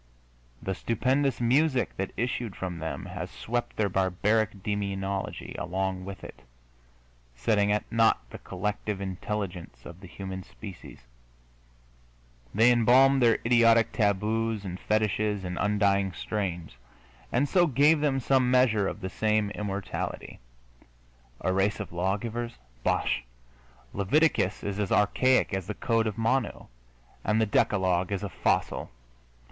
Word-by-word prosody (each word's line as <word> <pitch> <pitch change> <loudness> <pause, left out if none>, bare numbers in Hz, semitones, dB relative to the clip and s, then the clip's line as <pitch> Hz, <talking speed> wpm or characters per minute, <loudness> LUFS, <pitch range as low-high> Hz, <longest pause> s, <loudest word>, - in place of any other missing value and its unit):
The 95 - -1
stupendous 130 +7 0
music 130 +2 +2
that 95 0 -2
issued 120 -3 -2
from 90 -2 -5
them 80 0 -4
has - - -6
swept 115 - -3
their 105 - +1
barbaric 100 +2 0
demonology 100 -2 -3
along 95 0 -2
with 100 -1 -8
it, - - -10 0.9
setting 105 - +2
at 105 - +1
naught 115 0 +4
the - - -8
collective 105 +2 -3
intelligence 95 -7 -5
of 85 +1 -10
the 95 - -11
human 95 +1 -6
species; 95 - -11 1.5
they 115 +4 +5
embalmed 130 +3 +5
their 115 -2 +5
idiotic 115 -1 +5
taboos 110 +1 0
and 90 -1 -5
fetishes 105 -2 0
in 90 0 -4
undying 100 -2 +2
strains, 90 - -4 0.5
and 135 +4 +2
so 175 +3 +3
gave 150 +3 +4
them 140 -3 +1
some 130 0 +2
measure 120 -6 +3
of 105 - -5
the 95 - -3
same 110 0 +1
immortality. 100 -2 -4 1.0
A 95 - 0
race 95 +3 +1
of 105 - -6
lawgivers? 110 +6 -2 0.3
Bosh! - - +1 0.7
Leviticus 105 - +2
is 100 0 -3
as 100 -3 -1
archaic 130 +4 +3
as 95 -2 -2
the 105 - -4
Code 115 -2 +1
of 105 - -4
Manu, 125 +3 0 0.6
and 105 +2 +1
the 110 - +3
Decalogue 95 -3 +1
is 100 0 -2
a 100 - -3
fossil. - - -1
105 Hz, 130 wpm, -28 LUFS, 95-115 Hz, 1.5 s, they